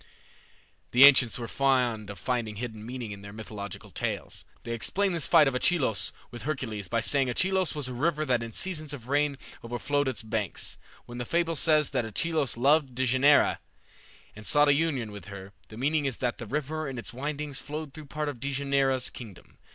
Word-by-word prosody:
'" - - -34
The 125 +3 +8
ancients 130 -4 +6
were 120 -1 -5
fond 125 -6 +1
of 100 - -7
finding 115 +1 -2
a - - -8
hidden 110 -3 -5
meaning 120 -1 -6
in 100 -1 -8
their 100 0 -9
mythological 100 -2 -8
tales. - - -3 0.2
They 115 - -4
explain 195 - 0
this 170 -3 +1
fight 160 -4 +6
of 135 - +1
Achelous 130 - +1 0.2
with 120 - -8
Hercules 120 -9 -3
by 115 +5 0
saying 135 +2 +3
Achelous 185 +6 +1
was 145 -3 +1
a 130 - -5
river 155 +4 0
that 125 -4 +1
in 115 0 -6
seasons 155 - -2
of 125 -2 -12
rain 145 0 +1 0.3
overflowed 140 +4 -1
its 130 -4 -2
banks. 110 -3 -3 0.3
When 120 0 -8
the - - -1
fable 165 +5 0
says 155 -1 +3
that 130 -3 0
Achelous 145 +5 -1
loved 140 +1 +3
Dejanira, 130 +3 +4 0.8
and 110 - -10
sought 145 +5 +4
a - - +7
union 140 -7 0
with 100 -4 -9
her, 100 0 -9
the 110 - -11
meaning 145 +4 +1
is 135 -4 -1
that 120 -2 -2
the 115 - -6
river 150 +3 -2
in 130 - -6
its 115 - -5
windings 145 +2 -4
flowed 150 -1 -6
through 155 -1 -9
part 150 +1 -3
of 140 -5 -4
Dejanira's 140 -1 0
kingdom. 105 -7 -12
130 Hz, 200 wpm, -28 LUFS, 115-150 Hz, 0.8 s, The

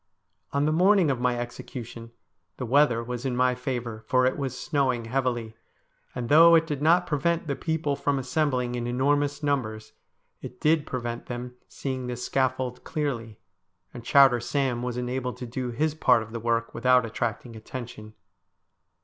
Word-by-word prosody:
On 140 +1 +1
the 155 - +2
morning 180 -1 +4
of 130 - -2
my 125 -1 +1
execution 120 -1 -7 0.5
the 125 - -4
weather 125 -2 +3
was 120 0 -5
in 130 -2 -1
my 125 0 +3
favour, 120 -3 -4
for 130 0 +3
it 130 - +2
was 130 -3 -4
snowing 130 -6 0
heavily, 120 -2 -2 0.6
and 125 -2 -3
though 165 +4 +7
it 165 0 +4
did 150 -3 -4
not 170 +4 +4
prevent 170 +3 0
the 140 -3 -2
people 160 -3 -1
from 140 0 0
assembling 130 -2 0
in 120 -1 -3
enormous 145 +4 0
numbers, 115 -7 -2 0.5
it 125 - -9
did 155 -1 +2
prevent 120 -2 -4
them 125 0 -6
seeing 130 -2 -4
the 125 - -3
scaffold 130 0 -1
clearly, 120 -8 -3 0.6
and 120 -2 -9
Chowder 135 0 +5
Sam 125 0 -1
was 125 -1 -3
enabled 125 0 -3
to 125 - -6
do 125 +1 -4
his 150 +6 0
part 120 -7 +3
of 110 - -13
the 115 - -4
work 115 0 -1
without 125 +1 +3
attracting 115 +1 -4
attention. 110 -1 -9
125 Hz, 165 wpm, -26 LUFS, 120-145 Hz, 0.6 s, though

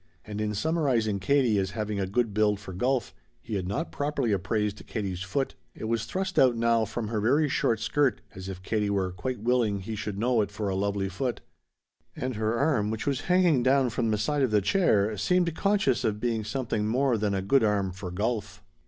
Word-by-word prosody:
And 105 0 -5
in 105 -1 -1
summarizing 125 -7 +1
Katie 120 -1 +2
as 95 0 -1
having 105 -1 -2
a 95 - -1
good 115 +2 0
build 105 -1 +2
for 100 -2 -9
golf 125 +5 0 0.3
he 110 - -8
had 95 -3 -2
not 105 - -3
properly 145 -5 -1
appraised 105 +2 -1
Katie's 95 -5 -3
foot. 130 +9 -2 0.2
It - - -9
was 115 0 -1
thrust 190 - -2
out 125 -3 +5
now 115 -1 +2
from 110 0 -4
her 110 -2 -1
very 140 +8 +3
short 115 -5 +1
skirt 140 +3 +1
as 95 0 -8
if 95 -1 -7
Katie 105 0 0
were 95 -2 0
quite 120 +5 -4
willing 115 -4 +1
he 110 +4 -5
should 105 -2 -4
know 120 +1 +2
it 100 - -1
for 100 0 -3
a 95 - -1
lovely 100 0 -1
foot. 120 +6 -3 0.7
And 130 0 -3
her 110 +2 0
arm, 130 -7 +1
which 110 0 -3
was 140 -3 0
hanging 180 -7 +4
down 130 0 +3
from 115 0 0
the 105 - +1
side 145 +7 0
of 130 - +3
the 105 -1 +3
chair, 105 - +2
seemed 175 - +2
conscious 195 - +1
of 105 -1 0
being 115 -1 -1
something 110 -2 -2
more 125 +2 +2
than 105 -2 0
a 95 - -1
good 125 +6 +3
arm 100 -3 +1
for 90 0 -7
golf. 105 +1 -3
110 Hz, 215 wpm, -27 LUFS, 100-130 Hz, 0.7 s, out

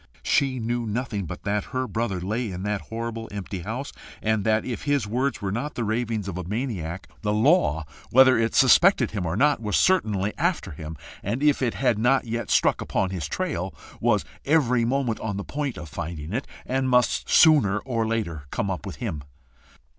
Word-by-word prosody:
She 135 -2 +2
knew 120 +1 -2
nothing 110 -3 -2
but 90 - -7
that 105 0 -1
her 130 0 -3
brother 110 -6 -2
lay 110 +6 -2
in 90 +1 -5
that 105 -1 -1
horrible 115 0 -4
empty 100 -1 -5
house, 115 +10 -5 0.3
and 110 -1 0
that, 110 0 +2
if 125 +1 -4
his 145 -5 +1
words 125 +2 -1
were 95 - -1
not 125 +8 -3
the 120 - -2
ravings 110 -2 -1
of 90 -2 -4
a - - -4
maniac, 95 -4 -4
the 105 -1 0
law, 105 - +3 0.2
whether 130 +1 +7
it 115 - +2
yet 115 - 0
suspected 135 - +5
him 100 -5 -2
or 85 +4 -2
not, 145 0 +3
was 105 -2 -1
certainly 105 - +2
after 170 - 0
him, 80 +1 -7 0.2
and 115 +8 -2
if 150 -2 +3
it 120 -3 0
had 125 -5 +1
not 130 +4 +3
yet 115 +1 -3
struck - - +3
upon 95 -1 -1
his 85 -6 -3
trail, 120 - -3 0.2
was - - +2 0.2
every 125 -6 +3
moment 125 -2 0
on 100 -3 -3
the 100 - -3
point 145 0 -3
of 85 - -7
finding 80 +2 -6
it, 130 +4 -2 0.2
and 130 0 0
must 125 -1 +2
sooner 145 - +6
or 115 -1 -2
later 85 -10 -2
come 100 +6 -2
up 95 +1 -5
with 95 - -6
him. 90 -12 -4
115 Hz, 200 wpm, -25 LUFS, 100-130 Hz, 0.3 s, whether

